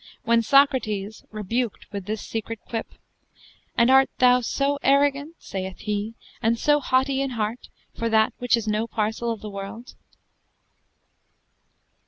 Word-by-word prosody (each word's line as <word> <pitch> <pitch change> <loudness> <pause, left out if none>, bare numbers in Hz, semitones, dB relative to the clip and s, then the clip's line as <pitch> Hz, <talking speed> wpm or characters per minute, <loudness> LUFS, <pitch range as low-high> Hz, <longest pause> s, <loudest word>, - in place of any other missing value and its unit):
When 230 0 +3
Socrates, 220 -6 +2
rebuked 215 +2 -3
with 200 -3 -5
this 215 0 -3
secret 225 0 -4
quip: 225 -1 -3 0.9
"And 235 +2 +5
art 265 0 +6
thou 250 0 +5
so 280 +4 0
arrogant 280 +3 +2
(sayeth 190 -1 -6
he) 210 +1 -3 0.3
and 230 +1 +2
so 295 +4 +3
hautie 265 +1 +1
in 275 - -1
heart 220 +3 -3 0.3
for 230 - -1
that 220 -1 +3
which 245 -1 +2
is 225 -1 -4
no 215 +2 0
parcell 225 +1 -2
of 225 - -5
the 215 - -6
world?" 200 +5 -8
230 Hz, 140 wpm, -24 LUFS, 215-260 Hz, 0.9 s, art